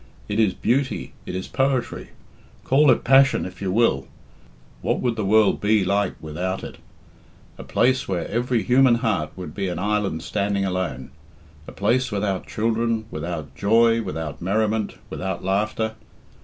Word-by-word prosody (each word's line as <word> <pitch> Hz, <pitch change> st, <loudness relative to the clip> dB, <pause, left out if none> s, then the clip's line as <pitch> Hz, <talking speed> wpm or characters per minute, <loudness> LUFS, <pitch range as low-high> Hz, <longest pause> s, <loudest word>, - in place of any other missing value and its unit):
It 105 Hz, +1 st, -2 dB
is 105 Hz, -4 st, +3 dB
beauty, 135 Hz, +2 st, -1 dB
it -, -, -4 dB
is 95 Hz, -, -4 dB
poetry. 130 Hz, -2 st, -1 dB, 0.5 s
Call 145 Hz, +2 st, +4 dB
it -, -, +4 dB
passion 135 Hz, +2 st, +5 dB
if 90 Hz, 0 st, -9 dB
you 95 Hz, -2 st, -1 dB
will 95 Hz, -, +2 dB, 0.7 s
what -, -, 0 dB
would 120 Hz, -2 st, 0 dB
the 110 Hz, -, -2 dB
world 105 Hz, +1 st, +3 dB
be 105 Hz, -1 st, +3 dB
like 100 Hz, 0 st, +1 dB
without 90 Hz, +5 st, -4 dB
it? -, -, -9 dB, 0.8 s
A -, -, -6 dB
place 130 Hz, +1 st, +1 dB
where 90 Hz, -3 st, -2 dB
every 120 Hz, +1 st, 0 dB
human 130 Hz, -1 st, +5 dB
heart 110 Hz, -10 st, 0 dB
would 90 Hz, -5 st, -7 dB
be 100 Hz, -1 st, -2 dB
an 90 Hz, -, -3 dB
island 100 Hz, -4 st, -1 dB
standing 100 Hz, 0 st, -1 dB
alone; 90 Hz, -9 st, -3 dB, 0.6 s
a -, -, -8 dB
place 120 Hz, +5 st, 0 dB
without 100 Hz, -2 st, -2 dB
children, 115 Hz, 0 st, 0 dB
without 80 Hz, -3 st, -5 dB
joy, 115 Hz, +5 st, +3 dB
without 80 Hz, -6 st, -5 dB
merriment, 110 Hz, +3 st, 0 dB, 0.2 s
without 95 Hz, -1 st, -4 dB
laughter. 105 Hz, +3 st, 0 dB
105 Hz, 155 wpm, -23 LUFS, 95-115 Hz, 0.8 s, passion